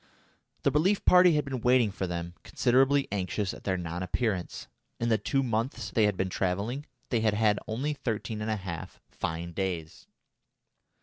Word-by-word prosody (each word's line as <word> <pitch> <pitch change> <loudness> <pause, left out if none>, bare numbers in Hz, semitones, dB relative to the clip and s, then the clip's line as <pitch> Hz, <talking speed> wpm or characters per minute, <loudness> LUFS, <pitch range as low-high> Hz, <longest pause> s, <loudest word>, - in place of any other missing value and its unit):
The 140 - +3
relief 180 +8 +2
party 180 -1 +7
had 150 - +1
been 130 -3 -4
waiting 125 -3 +4
for 95 -1 -3
them, 85 0 -4
considerably 135 +3 +3
anxious 100 0 -1
at - - -12
their 95 -2 +1
non 85 0 -4
appearance. 90 -1 -2 0.3
In 115 - 0
the 110 -1 +3
two 135 -1 0
months 115 -3 -2
they 110 +2 +3
had 105 -2 +1
been 95 - 0
travelling, 100 - -2 0.2
they 120 - +2
had 110 -2 +2
had 105 -1 +3
only 130 +7 -1
thirteen 115 -5 -3
and 110 - -2
a 110 - +1
half 90 -6 -7
fine 85 +1 -4
days. 85 -3 -4
110 Hz, 175 wpm, -29 LUFS, 95-130 Hz, 0.3 s, party